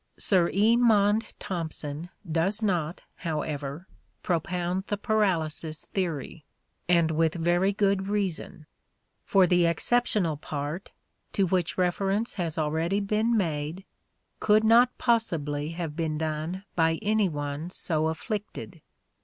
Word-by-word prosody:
Sir 180 -4 +3
E. 215 +4 +4
Maunde 215 -2 +3
Thompson 160 -2 -4 0.2
does 180 +7 +1
not, 175 -5 0 0.2
however, 150 -1 -4 0.4
propound 180 +2 -1
the 205 - -1
paralysis 165 -7 0
theory; 165 -4 -3 0.5
and 170 -2 +4
with 160 +1 +1
very 175 +3 +2
good 195 -1 +1
reason: 190 -4 -2 0.6
for 195 -1 +5
the 175 -1 +3
exceptional 190 -3 +1
part, 150 +4 -5 0.4
to 195 - +2
which 180 -2 0
reference 195 +4 0
has 170 -3 -3
already 160 +5 0
been 215 +3 +1
made, 160 0 -2 0.5
could 215 0 +4
not 235 +3 +6
possibly 155 - 0
have 165 -3 -4
been 160 -2 -1
done 160 +4 -3
by 165 -1 +2
any 210 -2 +2
one 145 +1 -4
so 160 -3 0
afflicted. 205 +6 -5
175 Hz, 120 wpm, -27 LUFS, 160-200 Hz, 0.6 s, not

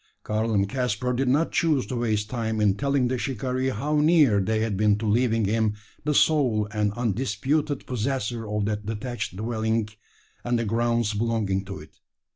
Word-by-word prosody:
Karl 110 +1 -1
and 100 -2 +2
Caspar 125 0 -1
did 130 +2 0
not 145 +6 +2
choose 150 -8 +2
to 115 - -5
waste 110 -3 0
time 110 -2 -2
in 105 -2 +4
telling 140 +3 +1
the 125 0 -1
shikaree 130 +1 -1
how 145 +6 -1
near 150 -9 +5
they 110 +3 0
had 110 -2 -1
been 105 +1 +3
to 110 - -4
leaving 115 0 +2
him 110 +1 +1 0.3
the 150 -1 +1
sole 125 -11 +3
and 105 -2 0
undisputed 125 +6 -1
possessor 120 -2 -2
of 105 -1 -1
that 105 0 -3
detached 115 -2 -4
dwelling 110 +1 -1 0.6
and 120 0 0
the 115 - -1
grounds 115 0 +1
belonging 105 -3 0
to 95 0 -6
it. 75 - -14
115 Hz, 175 wpm, -25 LUFS, 105-130 Hz, 0.6 s, near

